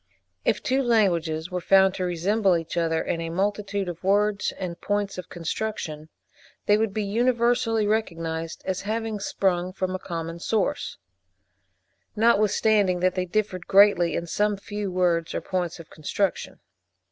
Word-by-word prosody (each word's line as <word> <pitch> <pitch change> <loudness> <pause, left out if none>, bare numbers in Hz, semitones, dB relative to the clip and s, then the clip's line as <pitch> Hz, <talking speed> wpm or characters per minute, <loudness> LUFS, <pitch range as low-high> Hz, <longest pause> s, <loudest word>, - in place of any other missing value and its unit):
If - - 0
two 265 +1 +1
languages 175 -9 +1
were 180 0 -2
found 190 +1 +5
to 185 - -3
resemble 185 +2 +2
each 165 0 -6
other 165 -1 +1
in 165 - -2
a 165 - -3
multitude 200 +2 -1
of 175 0 -6
words 205 +1 +2
and 175 -3 -5
points 205 -2 -1
of 180 - -8
construction, 165 -3 -4 0.6
they 205 - +5
would 220 -1 +1
be 215 +2 -2
universally 235 +1 +1
recognised 165 -6 -2
as 190 -1 -2
having 220 0 -3
sprung 185 -2 0
from 185 0 -3
a 185 - -3
common 165 -2 -5
source, 210 +3 -1 1.2
notwithstanding 210 -3 +3
that 185 0 +3
they 185 -1 -1
differed 185 -1 -2
greatly 195 -3 +5
in 170 - -2
some 205 +4 0
few 205 0 -5
words 175 -2 +1
or - - -1
points 180 -3 -3
of 165 - -12
construction. 185 +5 -2
190 Hz, 150 wpm, -25 LUFS, 170-210 Hz, 1.2 s, found